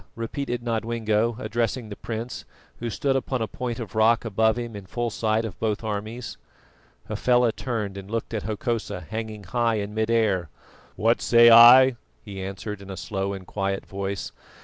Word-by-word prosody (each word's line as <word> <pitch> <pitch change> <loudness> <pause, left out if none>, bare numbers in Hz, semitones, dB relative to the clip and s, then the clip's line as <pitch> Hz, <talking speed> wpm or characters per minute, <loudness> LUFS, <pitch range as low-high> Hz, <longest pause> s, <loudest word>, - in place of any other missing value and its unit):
repeated 120 +1 -4
Nodwengo, 115 -1 0
addressing 115 0 -2
the 105 - -6
prince, 115 +3 -5 0.4
who 120 - -3
stood 135 +4 0
upon 130 -1 -1
a 110 - -1
point 120 +1 -4
of 110 -5 -7
rock 115 +2 +3
above 110 +1 +2
him 120 -2 -5
in 100 -2 -9
full 120 +3 -2
sight 110 +1 0
of 105 -6 -7
both 110 -1 -1
armies. 110 +3 -5 0.7
Hafela 120 +2 +2
turned 110 -5 -4
and 95 0 -11
looked 115 +1 -3
at 110 - -1
Hokosa 110 -2 -3
hanging 110 +3 -6
high 115 +4 0
in 105 0 -3
mid 110 +1 -1
air. 105 -8 +1 0.5
"What 115 +2 +2
say 120 0 +7
I?" 120 +2 +9 0.3
he 100 -3 -7
answered 100 +2 -6
in 100 - -11
a 95 - -6
slow 95 +2 -3
and 95 -1 -8
quiet 95 0 -3
voice. 100 0 -4
110 Hz, 170 wpm, -25 LUFS, 100-120 Hz, 0.7 s, I